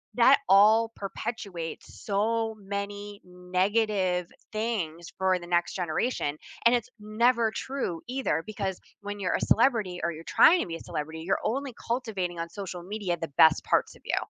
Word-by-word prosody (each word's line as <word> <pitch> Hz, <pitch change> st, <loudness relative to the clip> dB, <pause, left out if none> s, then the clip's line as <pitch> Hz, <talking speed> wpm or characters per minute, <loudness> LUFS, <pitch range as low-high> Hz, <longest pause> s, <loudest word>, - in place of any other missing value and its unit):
that 250 Hz, +3 st, +6 dB
all 220 Hz, +3 st, +6 dB
perpetuates 195 Hz, -4 st, -6 dB
so 220 Hz, +2 st, 0 dB
many 200 Hz, +1 st, -5 dB
negative 185 Hz, 0 st, 0 dB, 0.2 s
things 200 Hz, -7 st, -3 dB
for 190 Hz, -1 st, +2 dB
the 175 Hz, -, -9 dB
next 175 Hz, 0 st, +1 dB
generation. 170 Hz, -, -1 dB, 0.3 s
And 235 Hz, -, +7 dB
it's 240 Hz, -1 st, 0 dB
never 225 Hz, +2 st, +2 dB
true 260 Hz, -11 st, -3 dB
either 255 Hz, -, -1 dB
because 195 Hz, -3 st, -3 dB, 0.2 s
when 205 Hz, 0 st, -6 dB
you're 190 Hz, -, 0 dB
a -, -, -2 dB
celebrity 220 Hz, -7 st, +2 dB
or 170 Hz, -, +1 dB
you're 160 Hz, 0 st, -9 dB
trying 350 Hz, -, +6 dB
to -, -, -2 dB
be 165 Hz, -, -4 dB
a -, -, -7 dB
celebrity, 160 Hz, +2 st, -5 dB
you're 185 Hz, +4 st, 0 dB
only 270 Hz, +4 st, -1 dB, 0.2 s
cultivating 210 Hz, -8 st, -2 dB
on 165 Hz, 0 st, -3 dB
social 180 Hz, -1 st, -6 dB
media 195 Hz, -2 st, -2 dB
the 165 Hz, -, -4 dB
best 160 Hz, -1 st, +6 dB
parts -, -, +1 dB
of -, -, -19 dB
you. -, -, 0 dB
200 Hz, 165 wpm, -28 LUFS, 175-225 Hz, 0.3 s, And